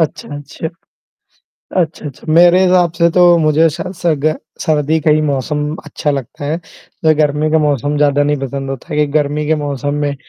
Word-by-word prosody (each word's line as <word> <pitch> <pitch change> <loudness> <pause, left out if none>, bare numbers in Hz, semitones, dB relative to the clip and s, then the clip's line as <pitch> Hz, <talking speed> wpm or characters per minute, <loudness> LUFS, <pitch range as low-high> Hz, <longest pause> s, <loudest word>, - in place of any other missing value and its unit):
अच्छा, 160 - -2
अच्छा। 145 +3 -6 1.1
अच्छा, 160 -2 -3
अच्छा 150 +3 -5
मेरे 175 +2 +6
हिसाब 180 -2 +3
से 170 0 +2
तो 175 0 +5
मुझे 155 +1 +3
शायद 180 +4 -6
सर 175 -2 0
स - - -6
ग 155 - +3 0.3
सर्दी 155 0 +1
का 155 - +2
ही 155 +1 +4
मौसम 150 +2 -2
अच्छा 150 - -3
लगता 140 +2 -5
है। 150 +3 -1 0.5
जो 155 0 +5
गर्मी 150 0 +1
का 160 - +3
मौसम 145 -1 0
ज़्यादा 145 -1 +2
नहीं 145 +1 +1
पसंद 135 0 -4
होता 135 - -7
है 150 - -2
क्योंकि 150 -1 +1
गर्मी 150 0 0
के 160 - +2
मौसम 145 0 -3
में 145 -1 -1
150 Hz, 200 wpm, -15 LUFS, 145-160 Hz, 1.1 s, मेरे